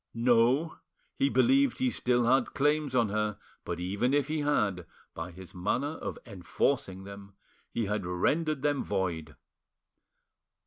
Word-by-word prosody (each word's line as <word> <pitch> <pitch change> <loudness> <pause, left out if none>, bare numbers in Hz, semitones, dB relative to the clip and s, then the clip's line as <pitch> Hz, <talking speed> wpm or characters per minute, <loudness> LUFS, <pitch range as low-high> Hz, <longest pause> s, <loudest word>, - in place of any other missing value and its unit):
No, 120 +6 +3 0.4
he 275 0 +3
believed 270 0 +3
he 260 -1 +1
still 125 - +1
had 130 +3 +2
claims 145 -1 +1
on 115 -4 +3
her, 105 0 -1 0.3
but 85 - -4
even 100 +9 0
if 145 0 +1
he 155 0 -1
had, 105 - 0 0.3
by 80 +2 -5
his 90 +1 -11
manner 120 - -1
of - - -5
enforcing 95 -1 -1
them 100 0 -11 0.4
he 115 - -1
had 105 0 -2
rendered 140 - 0
them 145 -2 +1
void. 85 -6 -2
115 Hz, 140 wpm, -29 LUFS, 95-145 Hz, 0.4 s, No